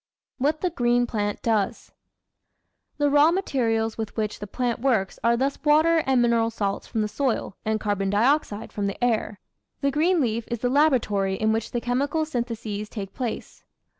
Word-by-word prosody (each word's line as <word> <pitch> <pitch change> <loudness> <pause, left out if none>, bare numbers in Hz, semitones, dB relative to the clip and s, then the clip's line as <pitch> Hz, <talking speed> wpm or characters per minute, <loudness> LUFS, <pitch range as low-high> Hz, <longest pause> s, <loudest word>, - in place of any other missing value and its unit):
What 295 +4 0
the 365 - 0
Green 245 -5 +2
Plant 205 -3 -3
Does 215 -4 -1 1.1
The 290 0 +2
raw 290 +2 +5
materials 230 - 0
with 220 0 -5
which 215 -1 -2
the 210 - -6
plant 240 +3 -2
works 230 -7 0
are 235 +1 +3
thus 270 +3 -1
water 310 +2 +4
and 265 -2 +3
mineral 230 -1 +2
salts 200 -3 -3
from 220 - -1
the - - -1
soil 230 -4 -2
and 220 0 0
carbon 205 -2 -1
dioxide 220 +1 +1
from 205 -1 -1
the 200 +4 -4
air. 220 -4 0 0.4
The 280 - +1
green 330 +5 +2
leaf 230 -4 0
is 235 - -2
the 245 +2 -1
laboratory 240 -9 +2
in 220 +2 +1
which 225 0 -2
the 240 - -3
chemical 280 +6 0
syntheses 230 -6 -4
take 195 -4 -6
place. 245 -4 -5
235 Hz, 175 wpm, -25 LUFS, 215-275 Hz, 1.1 s, raw